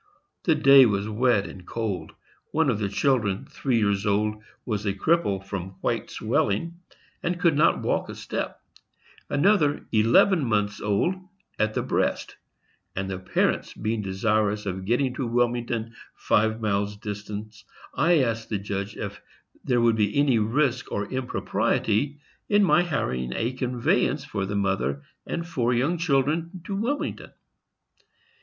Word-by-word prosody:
The 160 - +4
day 140 -3 +7
was 100 -1 -1
wet 110 -2 +2
and 90 - -10
cold; 100 -5 -4 0.4
one 155 -3 +2
of 105 - -2
the 100 -2 -1
children, 105 -3 +1
three 130 -4 -1
years 100 -3 +1
old, 105 +1 0 0.2
was 105 -3 -2
a 100 -2 -1
cripple 100 - +1
from 95 -1 -5
white - - -1
swelling, 165 - -1 0.4
and 175 +1 -2
could 170 -5 +3
not 155 +3 +3
walk - - 0
a - - -6
step; - - -4 0.7
another, 150 -1 +2
eleven 120 - +4
months 105 -3 0
old, 105 - +1 0.5
at 110 0 +1
the - - 0
breast; - - -1 0.6
and 95 0 -3
the 95 - -4
parents 95 - 0
being 110 0 -2
desirous 105 +1 0
of 95 -1 -4
getting 125 +4 +1
to 130 -1 -3
Wilmington, 120 -1 0 0.2
five 110 +1 +1
miles 105 -1 -1
distant, 105 0 -7 0.3
I 160 -2 +3
asked 115 -2 -2
the 105 - 0
judge 100 +1 -4
if 100 0 -6 0.4
there 125 -2 +2
would 115 -1 +3
be 105 +3 +1
any 140 -5 +4
risk 125 +3 0
or 100 0 -3
impropriety 130 0 0 0.3
in 205 0 +4
my 175 -2 +5
hiring 65 - -2
a 115 +3 -1
conveyance 125 -2 0
for 95 -1 -3
the 100 - -3
mother 95 -9 0 0.2
and 170 0 -3
four 125 -7 0
young 150 +8 +1
children 160 +3 0
to 195 +3 -4
Wilmington. 240 +9 -3
115 Hz, 150 wpm, -25 LUFS, 100-140 Hz, 0.7 s, day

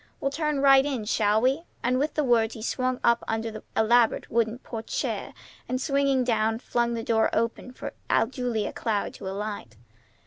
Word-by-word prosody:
We'll 275 - -1
turn 300 -1 -1
right 270 -1 +7
in, 265 -6 -2
shall 210 -1 +2
we?" 265 +5 +2 0.2
And 255 +1 +2
with 295 +3 -1
the 300 - +1
words 235 -3 +2
he 220 - -8
swept 255 +1 -1
up 235 0 +3
under 225 0 -2
the 215 0 -8 0.2
elaborate 230 +1 +3
wooden 230 0 +1
porte 225 -3 -8
cochère, - - -2 0.4
and, 255 - -1
swinging 275 -2 +2
down, 225 -2 +1
flung 235 0 -1
the 230 - -3
door 225 -1 +2
open 230 +2 -1
for - - -7 0.4
Julia 245 -5 -2
Cloud 215 -3 -2
to - - -8
alight. 200 - -5
235 Hz, 180 wpm, -26 LUFS, 220-260 Hz, 0.4 s, right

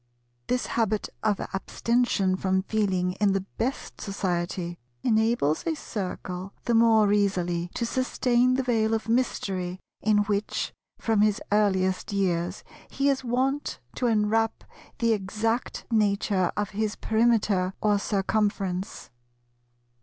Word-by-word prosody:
This 250 0 0
habit 220 -2 0
of 210 -2 +1
abstention 200 -1 +1
from 190 0 0
Feeling 190 -4 0
in 200 -2 +4
the 195 -1 -1
best 260 +4 -3
society 175 -3 -2 0.2
enables 220 -9 +2
a 325 - +1
Circle 185 -6 -5
the 240 - +1
more 220 -3 +5
easily 180 -4 0
to 235 - -1
sustain 255 0 +2
the 265 - 0
veil 225 -3 +2
of 220 - -4
mystery 190 -6 -1 0.2
in 210 -1 +3
which, 205 0 -2 0.2
from 220 -2 +1
his 210 -1 +3
earliest 190 -3 +2
years, 180 -2 -1 0.3
he 275 +1 +1
is 270 -1 0
wont 260 +4 -1 0.2
to 250 - +1
enwrap 225 0 +1 0.3
the 230 -1 +3
exact 220 +4 -2
nature 200 -4 +2
of 205 -1 -1
his 215 +2 -1
Perimeter 220 -5 +2
or 210 -1 +2
Circumference. 200 -2 -1
210 Hz, 125 wpm, -26 LUFS, 190-230 Hz, 0.3 s, more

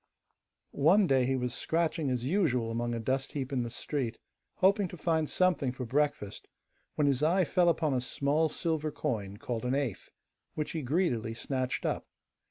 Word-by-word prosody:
One 185 +8 +4
day 135 -5 +3
he 135 - +1
was 125 -2 -1
scratching 160 0 0
as 125 -2 -1
usual 130 - +1
among 120 +1 -1
a - - -2
dust 130 +4 -1
heap 140 -1 -3
in 130 - +1
the 120 - -3
street, 125 0 -3 0.4
hoping 195 +1 +3
to 180 - -9
find 160 -2 0
something 175 -8 +2
for 125 0 -5
breakfast, 135 -5 -1 0.5
when 150 - +2
his 140 -2 +2
eye 175 +4 +3
fell 175 +2 +3
upon 160 -4 +1
a 125 - +1
small 145 +5 +1
silver 155 -1 -1
coin, 105 -10 -3
called 115 +1 -4
an 125 +2 0
eighth, 135 -8 -2 0.5
which 150 - -2
he 160 - -3
greedily 125 -6 0
snatched 130 +1 -2
up. - - -1
140 Hz, 180 wpm, -30 LUFS, 125-160 Hz, 0.5 s, One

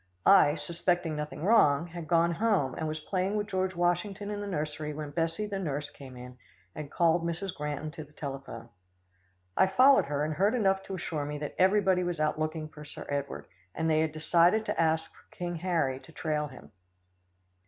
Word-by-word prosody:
I, 150 -7 +7
suspecting 170 +1 -1
nothing 150 +1 -5
wrong, 170 -8 +5
had 170 -2 -8
gone 170 0 +3
home, 180 - +1
and 160 - -3
was 155 0 -3
playing 185 +5 -1
with 210 -1 0
George 185 -2 -1
Washington 190 +4 0
in 205 0 -4
the 205 - -4
nursery 150 -3 -3
when 150 -1 -5
Bessie 165 +6 -1
the 200 -2 -3
nurse 145 -5 -3
came 130 -3 -11
in, 125 0 -10 0.3
and 150 -2 -7
called 170 0 +3
Mrs. 175 +3 -3
Granton 150 +1 -4
to 160 -1 -8
the 150 - -18
telephone. 135 -6 -7 0.9
I 190 - +5
followed 255 - +6
her, 145 +1 -1
and 155 - -2
heard 200 +9 +2
enough 195 -4 +2
to 195 - -5
assure 160 -4 -3
me 150 0 -4
that 145 -1 -5
everybody 190 -1 +4
was 175 -2 -2
out 155 0 0
looking 155 0 -2
for 150 -1 -12
Sir 145 - -9
Edward, 140 -1 -3 0.3
and 160 - -1
they 155 -1 +3
had 160 0 +1
decided 170 +7 +3
to - - 0
ask 160 0 +1
for - - -23
King 175 -1 -3
Harry 160 -7 0
to 165 - -16
trail 150 -2 -2
him. 130 -3 -14
165 Hz, 195 wpm, -29 LUFS, 150-185 Hz, 0.9 s, I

